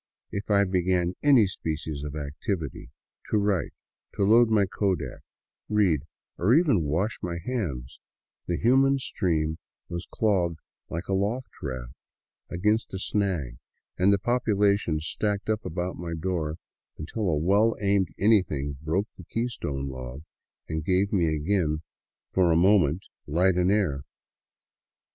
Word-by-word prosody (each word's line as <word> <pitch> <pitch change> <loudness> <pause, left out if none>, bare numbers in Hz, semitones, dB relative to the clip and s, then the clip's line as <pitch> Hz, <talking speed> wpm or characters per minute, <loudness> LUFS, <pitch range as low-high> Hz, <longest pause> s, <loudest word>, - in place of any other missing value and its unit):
If 100 +1 -5
I 100 -1 +5
began 90 -1 +1
any 135 -7 +6
species 80 -5 -4
of 75 0 -5
activity, 75 - -4 0.2
— - - -22
to - - +2
write, 100 -3 +1 0.5
load 110 +4 +5
my 105 -3 +4
kodak, 95 -2 -2 0.5
read, 95 -9 +2 0.3
or 105 +9 +4
even 155 - +4
to 80 -4 -1
wash 95 +10 -1
my 85 -1 -3
hands, 85 - -4 0.5
the 85 - 0
human 135 +4 +4
stream 80 - -1 0.3
was 85 0 -5
clogged 90 -7 +1 0.3
like 85 +3 -4
a 95 - -1
log 105 +7 0 0.2
raft 65 -3 -5 0.6
against 105 +6 0
a - - -2
snag 90 - -1 0.4
and 95 +2 +4
the 100 - +4
population 105 -6 +1
stacked 100 +6 -1
up 110 0 -1
about 90 +2 -3
my 85 -1 -4
door 80 -3 -2 0.4
until 95 +6 -2
a 80 - +1
well 100 +8 +3
aimed 100 -2 +2
anything 80 -10 +2
broke 85 +7 -1
the - - -11
keystone 90 - -3
log, 65 +1 -7 0.4
and 80 0 -3
gave 95 +4 +1
me 90 -4 +3
again 80 0 0 0.5
for 90 -3 +4
a - - +4
moment 90 -2 +4 0.2
light 90 +5 +3
and 90 +1 +3
air. 90 -10 +1
90 Hz, 140 wpm, -27 LUFS, 80-105 Hz, 0.6 s, any